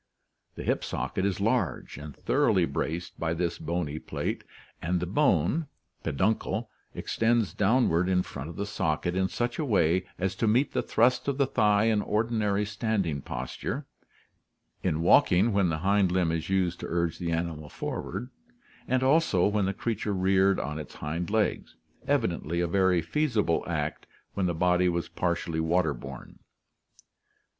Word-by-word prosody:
The - - -6
hip - - 0
socket 95 - -2
is 100 - -2
large 100 - 0
and 75 -1 -9
thoroughly - - +2
braced 85 +2 -4
by 80 0 -1
this 85 0 -2
bony 80 -2 -2
plate - - -4 0.4
and 90 +2 0
the 90 - -2
bone 110 - +2 0.4
(peduncle) 110 - -1 0.2
extends 115 -6 +1
downward 100 -5 +2
in 90 -1 +2
front 70 +4 -7
of 85 - -8
the 100 - -3
socket 90 -4 -1
in 95 0 +2
such 120 +4 -2
a - - +1
way 95 - +2
as 95 +1 -1
to 115 - +1
meet 125 +6 +3
the - - +1
thrust 125 +3 +2
of 140 -2 0
the 140 - +3
thigh 105 -5 +3
in 110 -2 +3
ordinary 105 -2 0
standing 105 - -1
posture, 65 0 -4 1.0
in 75 - 0
walking 95 +5 +5
when 100 -3 +3
the 80 - -1
hind 100 -2 +3
limb 90 -3 +2
is 80 +1 -3
used 90 -3 +1
to - - -5
urge 85 -1 -1
the 85 -2 -2
animal 80 -2 -3
forward, 125 - -5 0.6
and 130 +1 +1
also 135 - +3
when 105 -1 +2
the 95 - +1
creature 105 -1 -2
reared 95 +1 +3
on 75 +1 -3
its 75 - -9
hind 80 +3 -3
legs, 110 0 0 0.3
evidently 85 +2 0
a 85 - +2
very 90 -1 +2
feasible 110 - +1
act - - -3 0.3
when 95 -2 0
the 85 - -1
body 90 +2 +3
was 85 0 -1
partially 85 -1 -1
water 85 +3 +2
borne. 65 -2 -10
95 Hz, 160 wpm, -28 LUFS, 85-110 Hz, 1.0 s, walking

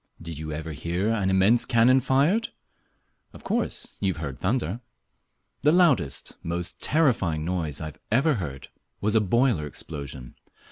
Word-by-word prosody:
Did 85 -2 -7
you 80 0 -5
ever 80 +1 -5
hear 85 +7 -2
an 100 -4 0
immense 95 +5 +4
cannon 125 +2 +4
fired? 145 - +2 0.8
Of - - -13
course - - -2
you 95 -2 +1
have - - -9
heard 65 -4 -5
thunder. 105 0 -1 0.8
The 150 - +4
loudest, 160 - +2
most 85 +1 -3
terrifying 100 - +2
noise 80 -5 -2
I 75 -1 -6 0.2
ever 140 +7 +3
heard 70 -5 -7 0.3
was 105 +1 0
a 110 - +4
boiler 110 - +2
explosion. 70 -4 -8
95 Hz, 145 wpm, -26 LUFS, 80-125 Hz, 0.8 s, immense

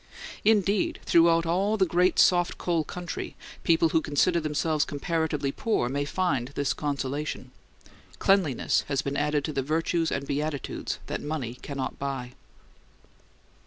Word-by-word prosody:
Indeed, 205 -2 +2
throughout 165 0 +4
all 195 +6 +1
the 190 - +4
great 180 +1 +2
soft 175 -1 +4
coal 170 -3 0
country, 175 +2 -6 0.3
people 165 -1 +4
who 160 - +2
consider 160 +4 +2
themselves 155 0 0
comparatively 150 -1 -1
poor 175 - 0
may 140 +2 -1
find 145 -7 0
this 140 -1 0
consolation: 140 -2 -3 0.7
cleanliness 185 -10 +2
has 140 -2 0
been 140 0 -3
added 150 -1 0
to 155 - -3
the 135 - 0
virtues 165 +3 0
and 140 0 -2
beatitudes 145 0 -3
that - - -4
money 145 -6 -3
can 140 +3 -8
not 130 -3 -4
buy. 135 -3 -4
155 Hz, 140 wpm, -27 LUFS, 140-170 Hz, 0.7 s, throughout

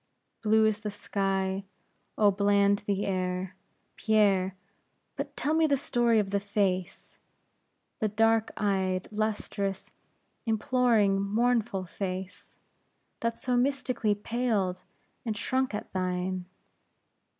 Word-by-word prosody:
Blue 220 0 +4
is 215 -1 +1
the 210 -1 -4
sky, 195 -1 -1 0.5
oh, 205 -2 +5
bland 200 0 +3
the 200 0 0
air, 185 0 -2 0.4
Pierre; 195 -4 +3 0.6
but 280 0 -5
tell 295 +3 0
me 320 0 +4
the 280 -2 +2
story 240 -3 +2
of 200 -2 +1
the 200 - +2
face, 195 -3 -2 0.8
the 215 - +1
dark 225 +1 +2
eyed, 190 -2 0
lustrous, 210 -2 -2 0.6
imploring, 220 -3 +3
mournful 220 -1 +1
face, 185 +1 -6 0.6
that 230 0 -1
so 250 -1 -1
mystically 250 -4 +1
paled, 205 -4 -1 0.4
and 220 -3 -3
shrunk 260 0 0
at - - -7
thine. 185 0 -2
205 Hz, 110 wpm, -29 LUFS, 190-225 Hz, 0.8 s, oh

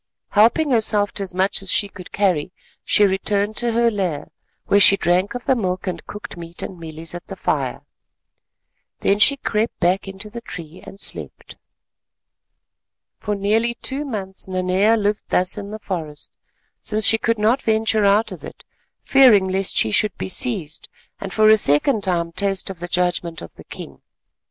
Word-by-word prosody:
Helping 235 +8 +3
herself 215 -3 +2
to - - -4
as 195 - -4
much 190 +2 +2
as 195 - -2
she 205 - +3
could 185 -2 -12
carry, 185 -5 0 0.3
she 210 - +3
returned 200 +2 0
to 240 -1 0
her 235 0 +2
lair, 185 -8 -3 0.4
where 200 - +3
she 200 0 +7
drank 180 +5 0
of 245 - -6
the 265 - +2
milk 185 -5 -3
and 180 -3 -5
cooked 210 +3 -9
meat 170 0 -9
and 185 - -7
mealies 160 0 -8
at 175 0 -9
the - - -7
fire. - - -2 1.2
Then 200 +1 +2
she 280 +6 +5
crept 225 -3 -2
back 185 +2 +1
into 195 +2 -8
the 235 +3 -9
tree, 170 -6 -10
and 195 - -11
slept. - - -5 1.6
For 210 -1 -3
nearly 220 +4 0
two 270 +4 -2
months 195 -10 -6
Nanea 185 +4 +1
lived 205 0 -1
thus 180 0 +1
in 205 -1 -7
the 215 - -6
forest, 160 -8 -7 0.5
since 215 0 -1
she 225 +2 +5
could 230 +1 0
not 220 +5 +2
venture 220 -1 +1
out 200 +2 +3
of - - -9
it—fearing 240 -8 +1
lest 190 0 -1
she 110 - +4
should 210 - +1
be - - -5
seized, 190 - -1 0.3
and 195 - -6
for 215 +1 +3
a 220 0 +7
second 205 - +2
time 170 -3 -1
taste 195 +2 -1
of 185 - -11
the 175 - -5
judgment 175 -2 -1
of 85 - -11
the - - -15
king. 70 -1 -10
200 Hz, 175 wpm, -20 LUFS, 180-220 Hz, 1.6 s, she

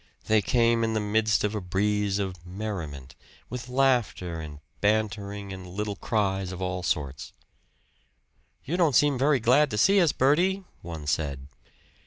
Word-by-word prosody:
They 110 -1 +3
came 115 +1 +2
in 110 0 0
the - - +2
midst 105 -1 +1
of 105 0 0
a 105 - -3
breeze 100 +2 0
of 95 -4 -4
merriment, 90 -9 -6 0.4
with 125 0 -6
laughter 125 -10 +1
and 75 -2 -8 0.2
bantering 100 -1 -1
and 95 -1 -9
little 100 +3 -4
cries 95 -3 -1
of 90 - -7
all 90 -1 -2
sorts. 75 -5 -3 1.3
"You 170 +6 -2
don't 160 -7 +3
seem 145 -1 +4
very 140 0 +3
glad 130 +6 +4
to 105 - -3
see 195 - +5
us, 165 -4 +4
Bertie!" 180 +9 +2 0.2
one 80 -3 -7
said. 70 -2 -2
105 Hz, 155 wpm, -27 LUFS, 90-120 Hz, 1.3 s, see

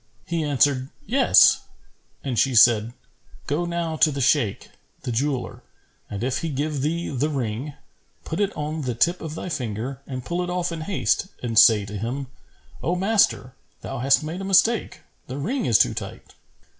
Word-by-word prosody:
He 170 -2 -2
answered, 140 -2 +1 0.2
"Yes," 265 +2 +5 0.6
and 130 -5 -1
she 135 -2 +2
said, 115 0 +5 0.5
"Go 155 +5 -1
now 170 -2 -3
to 155 - +5
the 140 - -4
Shaykh, 125 -5 +1 0.3
the 125 - -3
jeweller, 130 +2 -2 0.5
and 100 +2 -5
if 130 +1 -1
he 165 - -3
give 145 0 -2
thee 165 +4 -2
the 140 +3 -1
ring, 135 +1 -3 0.5
put 160 - -4
it 205 -1 +1
on 155 +1 -3
the 125 -4 -3
tip 175 +9 +1
of 160 -1 -6
thy - - -6
finger 125 - -4
and 130 -2 -6
pull 175 +1 -2
it 180 - -4
off 180 -1 -1
in 165 -1 -5
haste 190 +2 0 0.2
and 115 -2 +3
say 105 -3 +6
to 105 0 -6
him, 130 +4 -4 0.5
'O 175 - 0
master, 195 - +1 0.3
thou 135 - -6
hast 135 +4 +3
made 165 +5 -5
a - - -5
mistake; 195 +4 +2 0.3
the 130 - -6
ring 225 - -2
is 115 - +5
too - - +3
tight.' - - -8
145 Hz, 180 wpm, -23 LUFS, 125-170 Hz, 0.6 s, say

